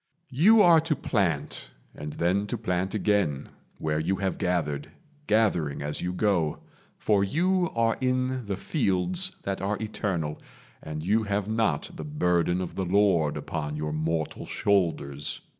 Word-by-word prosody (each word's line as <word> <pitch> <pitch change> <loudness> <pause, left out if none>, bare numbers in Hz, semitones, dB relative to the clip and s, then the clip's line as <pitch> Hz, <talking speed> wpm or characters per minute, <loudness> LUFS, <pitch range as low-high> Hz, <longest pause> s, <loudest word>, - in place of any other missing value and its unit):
You 205 - +6
are 170 -2 +7
to 155 0 0
plant, 95 - -1 0.2
and 75 0 -7
then 95 +4 +1
to 120 - -2
plant 95 -2 -1
again 100 -10 +1 0.3
Where 75 0 -1
you 90 +5 0
have 95 -1 -2
gathered, 75 -6 -1 0.4
gathering 90 -10 +1
as 75 +1 -3
you 90 - -1
go; 90 -5 0 0.3
For 100 -2 +2
you 175 - +1
are 115 -1 +2
in 130 -2 0
the 100 -2 -2
fields 155 - 0
that 95 -2 -3
are 100 +2 -1
eternal, 95 -8 -3 0.4
And 75 0 -6
you 105 +6 +2
have 100 0 -1
not 110 -9 0
the - - -6
burden 90 - +1
of 90 - -5
the 95 - -2
Lord 90 -5 +3
Upon 75 -2 -4
your 75 0 -3
mortal 80 0 -2
shoulders. 85 -9 0
95 Hz, 150 wpm, -27 LUFS, 80-110 Hz, 0.4 s, are